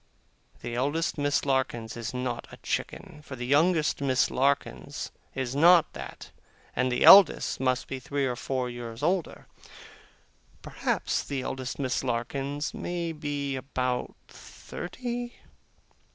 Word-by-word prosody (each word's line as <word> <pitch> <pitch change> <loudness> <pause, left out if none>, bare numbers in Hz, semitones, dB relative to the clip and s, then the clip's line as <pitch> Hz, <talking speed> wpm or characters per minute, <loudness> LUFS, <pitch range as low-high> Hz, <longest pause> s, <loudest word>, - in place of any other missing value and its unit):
The 120 - -5
eldest 145 +6 -1
Miss 145 0 +1
Larkins 130 -5 -1
is 115 -1 -4
not 125 -1 -3
a - - -11
chicken; 150 - -4
for 135 - -8
the 125 -1 -5
youngest 155 +3 +2
Miss 130 -2 +2
Larkins 140 +2 -1 0.2
is 130 -1 -3
not 170 +3 +6
that, - - -9 0.4
and 125 +1 +1
the 125 - +1
eldest 195 -4 +8
must 130 0 0
be 135 - -5
three 140 +2 -2
or 125 -2 -1
four 130 +1 -2
years 120 0 -7
older. 175 +1 -1 1.2
Perhaps - - -1
the 140 -2 -3
eldest 130 0 -4
Miss 130 -2 -1
Larkins 135 +4 -2
may 170 -1 -3
be 145 -3 -3
about 130 -1 -2
thirty. 240 +5 -7
135 Hz, 130 wpm, -28 LUFS, 125-150 Hz, 1.2 s, eldest